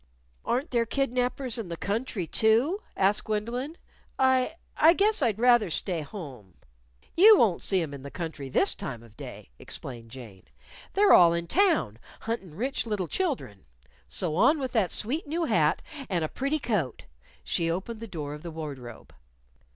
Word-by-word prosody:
"Aren't 260 +6 -1
there 235 -2 +1
kidnapers 250 -1 -1
in 220 - -5
the 170 - -5
country, 205 -1 -2
too?" 230 - +2 0.2
asked 195 +2 +2
Gwendolyn. 235 +9 -3 0.4
"I 260 +3 +2 0.2
I 320 +2 +6
guess 415 +1 +2
I'd 225 -6 +1
rather 240 -4 +4
stay 170 +1 -1
home." 140 - -9 0.6
"You 420 +4 +8
won't 210 - +3
see 190 -3 +1
'em 145 -3 -6
in 140 - -8
the 140 - -8
country 160 -4 -6
this - - +3
time 120 -3 -6
of 115 -2 -18
day," - - -10
explained 120 -3 -8
Jane. 115 -7 -11 0.5
"They're 410 +1 +5
all 170 -1 +7
in 170 0 -2
town, 320 - +2 0.2
huntin' 195 -8 -4
rich 250 +4 -2
little 205 -5 -2
children. 255 - -3 0.4
So 155 - -2
on 290 - +4
with 260 -2 -3
the 215 -6 +2
sweet 270 - -1
new 330 +3 -1
hat - - +2 0.3
and 175 -4 0
a - - -2
pretty 275 - -1
coat!" 210 - -2 0.4
She 165 -1 -1
opened 190 +7 -3
the 230 - -7
door 150 -7 -5
of 150 - -9
the 170 - -7
wardrobe. 140 -7 -8
210 Hz, 165 wpm, -27 LUFS, 155-260 Hz, 0.6 s, You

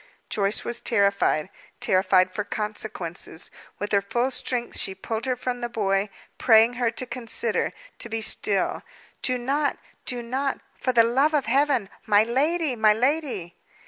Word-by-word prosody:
Joyce 200 0 +1
was 240 0 0
terrified 200 -7 +2 0.3
terrified 185 -1 +3
for 210 - -2
consequences. 205 -6 -2 0.3
With 205 - -4
her 200 -1 +4
full 240 +6 0
strength 245 -1 -2
she 190 - -2
pulled 220 +4 -4
her 255 - +1
from 250 0 -4
the 240 - -2
boy, 200 -3 0 0.3
praying 225 0 +6
her 235 - +3
to 240 +2 -3
consider 235 -2 -1 0.3
to 235 - -3
be 225 0 -2
still. 205 -3 0 0.4
"Do 255 -1 +1
not, 280 +4 0 0.3
do 245 -1 -1
not, 265 +3 -2
for 255 - -1
the 235 -2 +6
love 270 +7 +2
of 285 - +1
Heaven! 270 -3 +2 0.2
My 210 0 +5
lady! 285 +5 +1
My 215 -2 +5
lady!" 250 - -1
230 Hz, 155 wpm, -25 LUFS, 205-255 Hz, 0.4 s, praying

